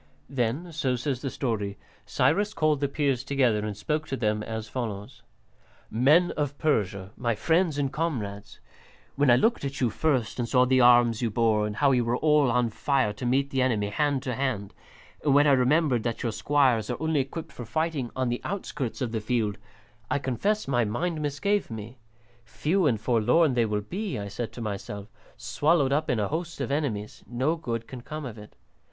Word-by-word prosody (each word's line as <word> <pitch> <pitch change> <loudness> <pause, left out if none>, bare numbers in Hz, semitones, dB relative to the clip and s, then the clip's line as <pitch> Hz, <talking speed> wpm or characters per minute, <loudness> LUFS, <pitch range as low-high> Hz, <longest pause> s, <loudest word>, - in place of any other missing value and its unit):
Then, 135 +7 -1
so 140 -5 0
says 125 +1 -2
the 135 - -2
story, 105 -7 -2 0.3
Cyrus 205 +6 +1
called 155 -3 +2
the 140 - +1
Peers 140 -3 0
together 125 -7 +1
and 105 -2 -4
spoke 155 +7 -2
to 135 - -3
them 105 -3 0
as 110 0 -5
follows: 110 +1 -5 0.7
"Men 150 +10 +4
of 145 -2 -3
Persia, 100 -9 0
my 120 -2 -1
friends 160 - +1
and 140 -2 -1
comrades, 115 -12 -3 0.6
when 140 -1 +3
I 120 - +8
looked 225 - +2
at 140 0 -4
you 125 -4 +1
first 130 -6 0
and 120 -1 -1
saw 125 -1 +4
the 130 0 +3
arms 120 -1 +5
you 120 - +1
bore 110 -1 +2
and 105 - -5
how 140 +4 +3
you 125 -2 +3
were 120 +1 0
all 150 -3 +3
on 120 -1 +1
fire 110 -3 +1
to 120 +4 -4
meet 135 +3 +1
the 130 - +1
enemy, 110 -5 +1
hand 140 +4 0
to 125 - -2
hand, 115 -6 -2 0.5
and 140 -2 +3
when 145 +1 +6
I 145 - +5
remembered 135 0 +3
that 120 +1 -3
your 115 - 0
squires 130 -3 +2
are - - -2
only 160 -1 +1
equipped 140 +5 -4
for 120 - -8
fighting 155 +1 -2
on 130 -1 0
the 120 - -2
outskirts 150 - -4
of 125 -3 -1
the 110 -1 -2
field, 110 -2 -1 0.5
I 140 - +1
confess 195 - -1
my 120 -3 +2
mind 160 +9 -2
misgave 150 +8 0
me. 110 +2 -8 0.4
Few 150 - 0
and 115 -6 +1
forlorn 125 +7 +3
they 120 -2 +2
will 105 -1 -1
be, 190 - -4
I 100 -1 -5
said 110 +2 -4
to 120 - -8
myself, 100 -1 -5 0.3
swallowed 140 +6 +2
up 155 +2 0
in 125 - +1
a 105 - 0
host 165 +1 -4
of 140 -2 -2
enemies; 125 -8 -2
no 130 +7 0
good 115 -8 -4
can 130 -2 -8
come 155 +4 -6
of 115 -4 -7
it. 105 - -13
130 Hz, 200 wpm, -27 LUFS, 110-145 Hz, 0.7 s, I